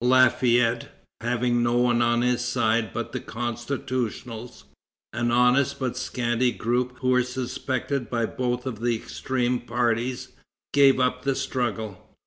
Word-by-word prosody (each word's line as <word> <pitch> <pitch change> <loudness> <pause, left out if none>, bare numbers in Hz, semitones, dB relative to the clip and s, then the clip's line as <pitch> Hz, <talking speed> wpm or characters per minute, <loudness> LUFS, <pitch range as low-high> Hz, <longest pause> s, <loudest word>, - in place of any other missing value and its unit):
Lafayette, 125 -1 +4 0.3
having 120 +1 +1
no 120 0 +2
one 120 -1 +3
on 120 0 +2
his 125 0 +1
side 110 -3 +1
but - - -4
the - - -3
constitutionals, 120 0 -4 0.5
an 120 +1 0
honest 125 +3 +3
but 125 -2 -2
scanty 125 -1 0
group 125 +3 -1
who 130 - +1
were 125 0 +4
suspected 125 0 -3
by 115 -2 0
both 125 +1 -2
of 120 -5 -4
the 120 0 +1
extreme 125 +2 -1
parties, 120 +2 -1 0.4
gave 140 -2 +6
up 125 0 +1
the 135 -1 0
struggle. 110 -7 -3
125 Hz, 135 wpm, -25 LUFS, 120-125 Hz, 0.5 s, gave